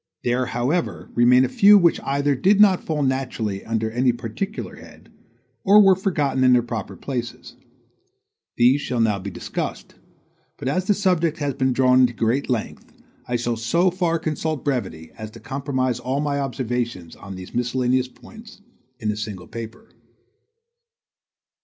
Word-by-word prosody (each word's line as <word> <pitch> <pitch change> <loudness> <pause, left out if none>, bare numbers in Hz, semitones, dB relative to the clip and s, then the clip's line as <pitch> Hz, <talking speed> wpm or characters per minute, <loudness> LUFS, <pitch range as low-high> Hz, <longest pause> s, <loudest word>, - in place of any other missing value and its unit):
There, 125 +1 0
however, 130 +9 -2
remain 125 +2 +5
a - - -1
few 205 +9 +6
which 175 -4 +3
either 140 +1 0
did 195 +10 +3
not 195 -3 +5
fall 150 -2 -1
naturally 125 -7 -2
under 110 -1 -2
any 125 +2 +2
particular 120 - -5
head - - -16 0.5
or 205 +2 +6
were 195 -2 +7
forgotten 150 -9 0
in 130 -1 +6
their 120 -1 +4
proper 115 -4 -6
places. 125 -4 -6 1.0
These 125 +4 +4
shall 125 -3 -3
now 110 -3 +2
be 100 +2 -6
discussed; - - -5 0.6
but 135 - -6
as 185 +7 0
the 205 - +2
subject 175 -5 +1
has 145 -3 -2
been 130 +1 0
drawn 130 0 +4
into 125 -1 +4
great 120 +5 -1
length, 120 -4 -3 0.4
I 125 - -1
shall 120 -1 -1
so 170 +11 +1
far 175 -2 0
consult 155 -2 -3
brevity 115 - -3
as 110 0 -6
to - - -13
comprise 130 -3 -2
all 130 +3 -2
my 145 -1 -1
observations 120 -8 -3
on 95 -1 -9
these 95 0 -10
miscellaneous 125 +1 0
points 220 - -15 0.4
in 110 -3 -2
a - - -4
single 105 -3 -6
paper. 115 - -9
130 Hz, 160 wpm, -22 LUFS, 120-155 Hz, 1.0 s, were